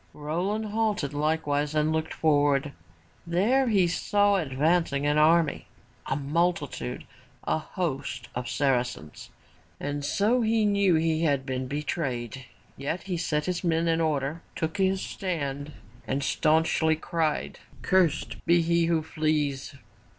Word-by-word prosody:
* - - -33
' - - -35 0.2
Roland 200 +7 -1
halted 210 -9 -1
likewise 150 0 0
and 155 +1 +2
looked 160 0 -1
forward. 145 -2 +2 0.6
There 225 +11 +2
he 200 -5 +4
saw 205 +3 +2
advancing, 150 -1 +1
an 150 +1 +3
army, 160 0 +3 0.4
a - - 0
multitude, 145 -3 -1 0.4
a - - 0
host 145 -7 -4
of 125 0 -4
Saracens. 125 - -1 0.5
And 145 0 -3
so 215 - +2
he 220 -1 +2
knew 200 -3 +3
that 160 - +2
he 160 -1 +1
had 140 -3 +1
been 130 -1 -3
betrayed, 130 -4 -3 0.3
yet 140 +6 -4
he 190 -2 -3
set 150 -3 -1
his 180 0 -2
men 165 -1 +1
in 165 0 +2
order, 150 0 -1
took 160 +3 -3
his 190 -1 +1
stand 145 -6 -4 0.4
and 135 +1 -1
staunchly 160 +2 +2
cried, 160 -1 -2 0.2
Cursed 175 -5 +1
be 170 0 +5
he 170 0 +2
who 165 -2 +1
flees!'' 150 -3 -1
160 Hz, 140 wpm, -27 LUFS, 145-175 Hz, 0.6 s, be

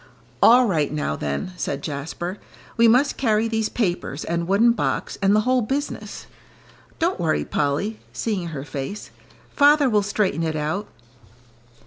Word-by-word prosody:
"All 250 +2 +7
right, 155 -10 0
now, 150 - -2
then," 75 - -3
said 140 -4 -3
Jasper. 160 +6 -5 0.4
"We 230 0 +5
must 250 +5 +3
carry 220 -3 +2
these 220 -1 -1
papers, 175 - -2
and 170 0 -2
wooden 210 +5 +4
box, 230 - -2
and 195 +1 +4
the 215 - +4
whole 255 +2 +2
business. 275 +6 -4 0.7
Don't 345 +3 0
worry, 160 -2 0
Polly," 150 +10 -1
seeing 200 -6 -2
her 150 -5 -6
face, 145 +8 -6 0.4
"father 290 0 +5
will 210 -1 +3
straighten 200 -4 0
it 160 -1 -1
out." 155 +7 -2
200 Hz, 145 wpm, -23 LUFS, 155-230 Hz, 0.7 s, All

